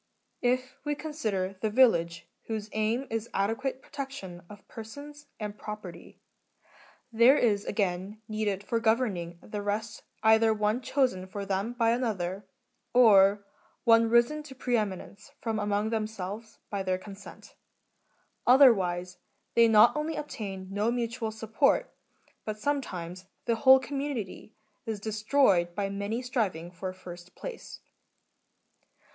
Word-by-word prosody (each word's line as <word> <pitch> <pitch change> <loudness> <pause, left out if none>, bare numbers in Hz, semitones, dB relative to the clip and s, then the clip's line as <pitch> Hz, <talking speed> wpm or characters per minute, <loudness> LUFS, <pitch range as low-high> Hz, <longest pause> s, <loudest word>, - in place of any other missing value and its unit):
* - - -48
If 255 0 -12
we 295 -1 -1
consider 215 -12 -3
the 220 - +1
village, 170 -9 +3 0.2
whose 215 -1 -4
aim 220 +5 0
is 225 0 -3
adequate 245 +7 -1
protection 230 -11 -7
of 205 -1 -13
persons, 285 +6 -10
and 210 -1 -5
property, 210 -6 -9 0.9
there 235 +5 +6
is 205 -4 +2
again 195 0 -2
needed 210 -2 -2
for 230 +2 -1
governing 220 -7 0
the 210 -1 -5
rest 210 +1 -3 0.2
either 220 0 +5
one 210 +3 0
chosen 250 -9 0
for 200 +1 -6
them 195 +4 -2
by 230 -2 +2
another, 200 -5 -2 0.5
or 200 -4 +6 0.4
one 230 -1 +5
risen 235 +6 +3
to 290 -3 -12
preeminence 215 -1 -3
from 225 -2 -2
among 205 +1 0
them 220 -2 0
selves 215 +2 -7
by 200 -1 -2
their 185 -1 0
consent; 195 +1 -12 0.9
otherwise, 190 -9 +4 0.3
they 235 0 +6
not 220 +3 +6
only 305 +1 -2
obtain 195 -10 -6
no 205 +3 0
mutual 235 -1 -2
support, 220 +5 +1 0.5
but 215 -1 -4
sometimes 185 -9 -3 0.2
the 235 - +2
whole 265 +1 +8
community 260 -7 -5 0.3
is 220 -2 -3
destroyed 210 -4 +2
by 200 0 -1
many 200 +5 -3
striving 195 -9 -2
for 185 +2 -5
first 180 -1 -11
place. - - -8
215 Hz, 130 wpm, -28 LUFS, 195-240 Hz, 0.9 s, whole